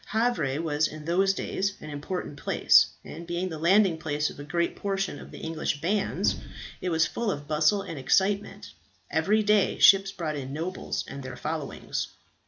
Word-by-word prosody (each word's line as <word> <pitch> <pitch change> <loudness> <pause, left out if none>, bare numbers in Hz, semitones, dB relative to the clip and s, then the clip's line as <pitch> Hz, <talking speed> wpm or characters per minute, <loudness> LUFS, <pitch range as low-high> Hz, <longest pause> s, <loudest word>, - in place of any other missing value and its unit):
Havre 215 - 0
was 155 -2 +1
in 155 -1 -9
those 190 +4 +3
days 195 0 -2
an 155 - -8
important 150 +1 -5
place, - - +5 0.2
and 170 - -9
being 175 +2 -2
the 160 -3 -6
landing 180 0 +4
place 150 -1 -1
of - - -13
a - - -6
great 170 +3 -1
portion 195 -1 -2
of - - -11
the - - -10
English 160 -2 -3
bands, 195 +6 0 0.4
it 185 - -1
was 160 -1 +3
full 235 -2 -2
of 145 -6 -4
bustle 155 +6 +2
and 160 - -6
excitement. 195 +9 +1 0.4
Every 215 +2 +2
day 210 -1 +3
ships 195 0 +6
brought 165 -6 -3
in 135 -1 -6
nobles 170 +5 -3
and 140 0 -7
their 130 0 -7
followings. 155 -2 -4
170 Hz, 180 wpm, -27 LUFS, 150-195 Hz, 0.4 s, ships